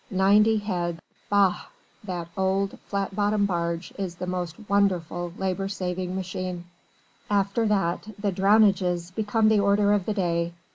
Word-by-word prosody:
Ninety 205 +3 +4
heads! 175 -5 -2 0.3
Bah! 200 -3 +3 0.4
That 180 -4 -4
old 195 0 0
flat 200 -1 -2
bottomed 205 0 +2
barge 170 -2 -2
is 185 -3 -3
the 180 - -5
most 180 -2 -3
wonderful 175 -3 0
labour 190 0 -1
saving 185 -1 -3
machine. 185 -1 -4 0.6
After 200 +2 +1
that 195 -2 0
the 200 -1 -1
"Drownages" 190 -3 +3
become 215 +1 +1
the 215 -1 +4
order 200 +1 +3
of 200 -3 0
the 215 - -1
day. 170 -3 0
190 Hz, 140 wpm, -25 LUFS, 180-205 Hz, 0.6 s, Ninety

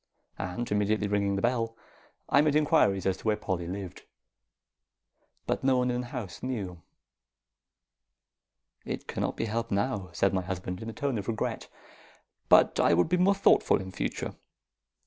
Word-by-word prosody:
And 95 +6 -4
immediately 105 0 +1
ringing 100 -1 +1
the 100 - -2
bell, 115 -2 0 0.5
I 140 - +5
made 150 -1 +2
inquiries 100 - +3
as 95 -1 +1
to - - -15
where 105 -1 +2
Polly 95 -4 -3
lived; 95 0 -6 1.4
but - - -1
no 130 -1 +3
one 125 0 +1
in 125 0 -1
the 125 - -7
house 120 -8 -6
knew. 100 -10 -4 2.0
"It - - -5
cannot - - -2
be - - -1
helped 115 +1 -2
now," 100 -2 -1
said 100 +3 +1
my 95 - +1
husband, 90 0 -5
in 110 - -5
a - - -4
tone 135 -4 -1
of 100 - -7
regret. 115 -2 -2 0.8
"But - - +6
I - - +5
would 90 - +2
be 180 - +3
more 190 +3 +4
thoughtful 195 - +4
in 95 0 -7
future. - - -3
105 Hz, 165 wpm, -29 LUFS, 95-125 Hz, 2.0 s, But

